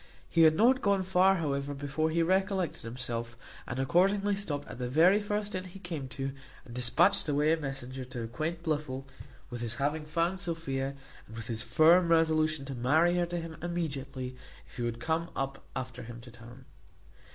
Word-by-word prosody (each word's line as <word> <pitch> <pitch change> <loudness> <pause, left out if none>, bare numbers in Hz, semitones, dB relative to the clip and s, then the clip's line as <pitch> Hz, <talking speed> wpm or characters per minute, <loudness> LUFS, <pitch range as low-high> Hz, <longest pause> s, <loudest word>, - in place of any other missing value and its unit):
He 165 - +2
had 160 -1 +7
not 255 +6 +4
gone 200 -2 +2
far, 190 +1 +4
however, 145 -4 -2
before 145 +3 -1
he 165 +1 +2
recollected 190 0 +1
himself, 120 0 -4 0.3
and 120 - -4
accordingly 195 +9 +3
stopt 180 -8 -3
at - - -9
the 125 -1 -2
very 170 +9 +5
first 205 0 -2
inn 185 0 -3
he 185 +1 -10
came 165 -8 -5
to, 135 +1 -4 0.3
and 120 - -11
dispatched 160 +10 +3
away 150 +2 +3
a - - +2
messenger 135 -3 -5
to 125 -2 -6
acquaint 155 +9 -3
Blifil 145 -5 -2 0.5
with 120 -1 -5
his 120 0 -1
having 145 +3 -1
found 170 +4 0
Sophia, 140 -6 -3 0.3
and 110 - -11
with 110 -1 -6
his 115 -1 -3
firm 160 +10 +5
resolution 160 -3 +2
to 135 - -5
marry 155 +8 +3
her 175 -1 +1
to 175 0 -3
him 165 -1 -5
immediately, 140 -7 -3 0.3
if - - -16
he - - -3
would 120 -1 -2
come 160 +7 -1
up 135 0 -3
after 130 -1 -5
him 120 0 -8
to 120 +1 -12
town. 120 0 -13
155 Hz, 185 wpm, -30 LUFS, 130-175 Hz, 0.5 s, had